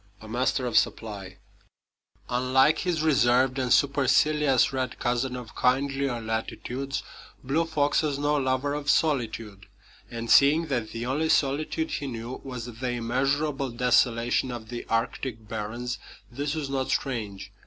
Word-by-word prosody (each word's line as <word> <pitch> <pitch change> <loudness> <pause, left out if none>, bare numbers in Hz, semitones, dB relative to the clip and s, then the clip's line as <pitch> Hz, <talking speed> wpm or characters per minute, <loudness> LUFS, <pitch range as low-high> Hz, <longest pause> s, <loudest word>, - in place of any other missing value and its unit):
A 110 - -12
Master 125 +3 0
of 120 - +5
Supply 100 -4 -4 0.9
Unlike 130 +5 +3
his 170 -4 -1
reserved 130 -2 +3
and 125 -2 -1
supercilious 140 0 +3
red 130 -1 -2
cousin 125 +1 -1
of 120 -4 -9
kindlier 135 0 +1
latitudes, 120 +4 -4 0.4
Blue 150 +6 +1
Fox 145 -3 +1
was 150 -3 -1
no 145 +1 +1
lover 135 0 0
of 145 0 -3
solitude; 115 -10 0 0.4
and 115 -1 -5
seeing 145 +7 +6
that 120 -5 -1
the 115 +1 -5
only 150 +5 0
solitude 155 +3 +1
he 140 - -3
knew 120 0 -6
was 125 -3 -6
the 125 +1 -5
immeasurable 135 +4 0
desolation 120 0 +2
of 115 -3 -7
the 120 -1 -6
Arctic 115 0 -2
barrens, 115 +3 -4 0.3
this 145 +4 -3
was 155 -3 -3
not 135 -1 -2
strange. 110 -8 -3
130 Hz, 140 wpm, -26 LUFS, 120-140 Hz, 0.9 s, seeing